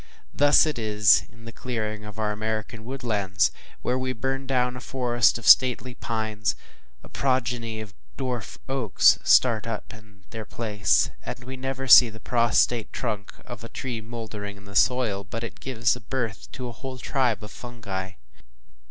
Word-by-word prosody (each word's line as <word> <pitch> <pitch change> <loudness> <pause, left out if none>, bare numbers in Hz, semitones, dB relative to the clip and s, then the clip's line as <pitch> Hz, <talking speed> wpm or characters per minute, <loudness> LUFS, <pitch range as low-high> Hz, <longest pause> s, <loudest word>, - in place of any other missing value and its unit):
Thus 145 +2 +5
it 150 -6 -2
is 105 -1 +4
in 115 0 -17
the 115 - -8
clearing 110 -3 -4
of 105 0 -10
our 110 -1 -1
American 110 +1 -4
woodlands; 105 -8 0 0.3
where 125 +1 0
we 130 0 -2
burn 135 +2 -3
down 125 -1 +1
a - - -6
forest 120 -3 +2
of 120 - -7
stately 130 0 +6
pines, 110 -5 -2 0.5
a - - -12
progeny 120 -4 -1
of 105 -1 -10 0.2
dwarf 125 -5 -4
oaks 130 -7 +4
start 115 -3 +4
up 110 -1 -5
in 105 -2 -17
their 110 -1 -6
place; 105 -6 +1
and 120 - -7
we 130 +1 -7
never 135 +1 -4
see 120 -1 +9
the 110 0 -12
prostrate 120 -1 +1
trunk 100 -2 -4
of 120 -1 -9
a 115 - -8
tree 120 -4 -5
mouldering 110 -3 -7
into 100 0 -13
soil, 110 -2 +2
but 115 +4 -6
it 115 - -7
gives 120 -4 0
birth 115 -6 -3
to 130 -2 -5
a - - -5
whole 130 +3 -8
tribe 125 -3 -1
of 105 - -9
fungi. 100 -6 -6
115 Hz, 165 wpm, -25 LUFS, 105-125 Hz, 0.5 s, see